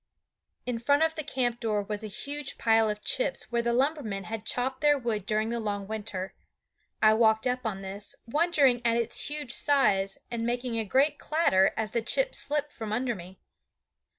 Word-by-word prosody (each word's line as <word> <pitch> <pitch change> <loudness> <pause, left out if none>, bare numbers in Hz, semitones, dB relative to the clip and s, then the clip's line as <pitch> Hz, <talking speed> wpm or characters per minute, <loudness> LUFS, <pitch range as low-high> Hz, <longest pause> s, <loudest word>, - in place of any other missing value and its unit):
In 245 -2 -2
front 285 +6 +3
of 320 0 +2
the 315 - -4
camp 245 -4 -1
door 210 -3 -1
was 210 +1 -4
a - - -4
huge 280 +7 -6
pile 225 -1 +3
of 210 0 -4
chips - - -1
where 235 0 +1
the 235 0 0
lumbermen 250 -6 0
had 220 0 -6
chopped 260 +2 -1
their 295 -1 +4
wood 220 -6 -3
during 215 +1 0
the 235 0 -2
long 205 -2 -3
winter. 200 -3 -5 0.7
I 215 0 +7
walked 220 0 +3
up 250 -1 -1
on 195 -2 -4
this, 195 +2 0
wondering 285 -2 +2
at 230 0 +2
its 235 -1 0
huge 295 -4 -4
size 210 -11 +3
and 235 -1 -2
making 240 0 -1
a 220 - 0
great 280 +7 +2
clatter 195 - +3
as 220 -1 -2
the 235 - 0
chips - - 0
slipped 295 0 0
from 220 -2 -6
under 240 +2 0
me. 185 -1 -10
235 Hz, 190 wpm, -28 LUFS, 215-275 Hz, 0.7 s, I